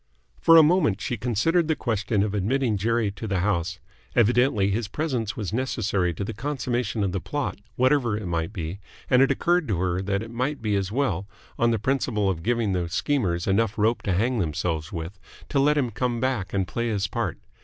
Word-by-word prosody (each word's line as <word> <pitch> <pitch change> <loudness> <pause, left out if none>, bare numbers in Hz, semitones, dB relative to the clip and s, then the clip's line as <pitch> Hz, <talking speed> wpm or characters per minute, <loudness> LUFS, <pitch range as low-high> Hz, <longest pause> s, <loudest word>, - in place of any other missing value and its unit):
For 165 0 +7
a 160 - +9
moment 150 - +3
she 120 - -2
considered 125 - +1
the 160 - +2
question 105 -4 0
of 105 -1 -2
admitting 110 +4 +1
Jerry 110 +1 +1
to 100 +3 -7
the 95 -3 0
house. 90 -2 0 0.4
Evidently 120 -3 +3
his 110 +1 -1
presence 125 -7 -2
was 105 -3 -4
necessary 110 -7 0
to 100 - -3
the 110 - -4
consummation 120 -4 -2
of 95 - 0
the 95 - -2
plot, 145 -7 -3 0.2
whatever 130 -3 +2
it 105 - -6
might 85 0 -2
be, 90 -2 -5 0.3
and 125 0 +6
it 135 - +5
occurred 175 -2 +1
to 105 -6 0
her 90 +1 0
that 100 +2 -1
it 115 - -9
might 130 +5 -2
be 105 -2 0
as 95 -1 -1
well, 105 -7 -1 0.3
on 120 - +4
the 115 - +2
principle 110 -4 0
of 85 -3 -5
giving 115 0 0
the 90 -2 -1
schemers 90 - 0
enough 110 +2 +1
rope 110 +3 +2
to 95 - -1
hang 115 +6 +1
themselves 80 -2 -2
with, 85 +3 -6 0.3
to 140 - +1
let 150 +2 +3
him 125 -5 +1
come 120 +2 -1
back 125 -7 -1
and 95 -2 0
play 120 +3 -2
his 105 -3 0
part. 95 - -2
110 Hz, 210 wpm, -25 LUFS, 95-125 Hz, 0.4 s, a